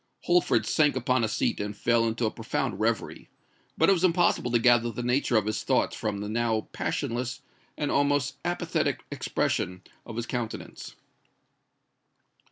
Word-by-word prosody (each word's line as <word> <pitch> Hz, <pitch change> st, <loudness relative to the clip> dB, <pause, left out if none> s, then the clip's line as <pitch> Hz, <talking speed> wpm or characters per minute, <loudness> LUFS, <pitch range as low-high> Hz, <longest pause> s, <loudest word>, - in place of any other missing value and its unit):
Holford 175 Hz, 0 st, +2 dB
sank 150 Hz, -3 st, +3 dB
upon 125 Hz, -1 st, +1 dB
a -, -, +2 dB
seat 105 Hz, -, -1 dB
and 105 Hz, 0 st, -4 dB
fell 115 Hz, 0 st, +2 dB
into 115 Hz, +1 st, -1 dB
a 110 Hz, -, 0 dB
profound -, -, -3 dB
reverie; -, -, -2 dB, 0.5 s
but -, -, +4 dB
it 195 Hz, -, +6 dB
was 180 Hz, -2 st, -1 dB
impossible 175 Hz, -7 st, +3 dB
to 120 Hz, -, +3 dB
gather 120 Hz, 0 st, +4 dB
the 120 Hz, +2 st, -5 dB
nature 125 Hz, 0 st, +2 dB
of 105 Hz, -, +1 dB
his 110 Hz, -, -1 dB
thoughts -, -, +1 dB
from 100 Hz, -2 st, -3 dB
the 105 Hz, -, -4 dB
now 110 Hz, 0 st, 0 dB
passionless 120 Hz, +2 st, -3 dB, 0.3 s
and 145 Hz, -, -1 dB
almost 145 Hz, -1 st, +1 dB
apathetic 175 Hz, 0 st, -1 dB
expression 90 Hz, 0 st, -1 dB, 0.2 s
of 115 Hz, -, -9 dB
his 120 Hz, 0 st, -3 dB
countenance. 120 Hz, -2 st, -5 dB
120 Hz, 160 wpm, -27 LUFS, 110-140 Hz, 0.5 s, it